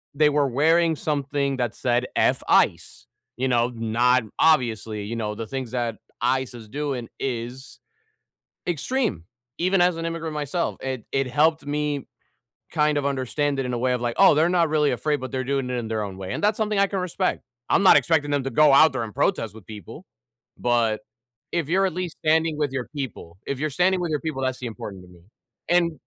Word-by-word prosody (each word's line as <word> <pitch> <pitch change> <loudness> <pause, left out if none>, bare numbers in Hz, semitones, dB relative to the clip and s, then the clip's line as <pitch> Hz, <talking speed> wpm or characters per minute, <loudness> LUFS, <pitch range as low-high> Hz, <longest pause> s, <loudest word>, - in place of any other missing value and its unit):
they 150 0 +4
were 145 -1 +2
wearing 160 +5 +3
something 140 -2 -1
that 120 -3 -2
said 125 -1 0
F - - +2
Ice, - - +2 0.3
you 130 - 0
know, 120 -1 +2
not 120 +2 +2 0.2
obviously, 115 -8 +2
you 115 +3 -4
know, 105 -2 -2
the 115 - -6
things 130 -2 -5
that 120 -3 -2 0.2
ICE 130 +1 0
is 115 -3 -11
doing 135 -3 -3
is 125 +1 -5 0.9
extreme, 210 - -1 0.3
even 185 +2 +2
as 175 -1 +3
an 165 - -4
immigrant 165 -1 -4
myself, 150 +4 -2
it 130 -3 -4
it 135 -1 0
helped 155 +4 +2
me 145 -1 -2 0.7
kind 150 -2 +2
of 140 - -1
understand 140 +1 -1
it 135 - 0
in 125 - -3
a 120 - -1
way 125 +1 +1
of 125 - -1
like, 120 -1 -2
"Oh, 195 -5 +7
they're 160 +3 +3
not 170 -3 +3
really 150 -2 +2
afraid, 150 +4 0
but 130 - -5
they're 130 0 -2
doing 135 -1 -1
it 125 - -1
in 115 -2 -4
their 110 -1 -1
own 95 -2 -6
way," 95 -1 -5
and - - -3
that's 210 +2 +2
something 215 -2 0
I 200 - +5
can 195 - -2
respect. 185 +1 -1 0.3
I'm - - +4
not 190 - +8
expecting 155 -3 +2
them 145 -1 +1
to 135 - -2
go 150 +3 +5
out 155 +3 +7
there 130 -3 -2
and 105 - -9
protest 125 - 0
with 110 - -13
people, 105 -5 -10 0.5
but 120 -3 +1 0.5
if 165 -4 -1
you're 195 +2 +3
at 185 - -3
least 180 -2 -4
standing 160 0 +2
with 145 -3 0
your 130 -2 -3
people, 110 - -6
if 140 - -3
you're 155 +1 -1
standing 180 +6 +2
with 175 -2 -2
your 150 - -1
people, 155 -5 -4
that's 130 -1 -2
important 105 -5 -7
to - - -16
me, 90 -1 -17 0.5
and 175 -1 +3
140 Hz, 210 wpm, -24 LUFS, 120-160 Hz, 0.9 s, not